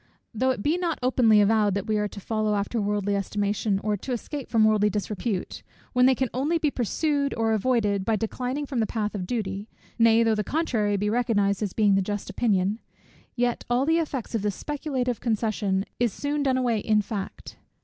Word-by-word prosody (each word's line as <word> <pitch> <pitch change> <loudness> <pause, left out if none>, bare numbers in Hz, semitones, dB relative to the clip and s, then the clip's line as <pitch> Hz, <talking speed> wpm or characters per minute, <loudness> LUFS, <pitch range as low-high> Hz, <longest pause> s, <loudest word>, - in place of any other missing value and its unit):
Though 255 +4 +1
it 245 -6 -1
be 325 +4 +1
not 340 -3 -1
openly 235 -4 +4
avowed, 205 -1 +3
that 200 - -2
we 215 - 0
are 210 0 0
to 205 - -10
follow 215 +1 -1
after 205 +3 -1
worldly 205 0 0
estimation, 205 +1 -1
or 210 0 +1
to 255 - -7
escape 275 +3 -5
from 225 -2 +4
worldly 210 -1 +3
disrepute, 210 -1 -3 0.3
when 250 0 +5
they 260 - +4
can 260 +1 0
only 285 +7 +1
be 305 -3 0
pursued 280 +4 0
or 225 -1 +1
avoided 210 -3 +1
by 220 +2 +1
declining 250 +6 -3
from 265 -3 -3
the 220 - +1
path 215 -2 -2
of 185 -4 -4
duty; 205 -2 -3 0.3
nay 230 0 +5
though 225 -1 +3
the 210 -1 0
contrary 220 - 0
be 210 +1 0
recognized 215 -4 +1
as 205 -3 -2
being 210 -2 +3
the 195 - +3
just 205 +1 -4
opinion; 200 -1 +1 0.6
yet 245 -1 0
all 245 +2 +2
the 325 +2 +3
effect 280 -8 -4
of 225 - 0
this 205 -2 -1
speculative 265 -5 -2
concession 210 -4 0
is 240 -2 +2
soon 290 +7 -2
done 265 -2 +2
away 240 -4 +1
in 210 0 +2
fact. 200 -1 -6
220 Hz, 200 wpm, -26 LUFS, 205-250 Hz, 0.6 s, when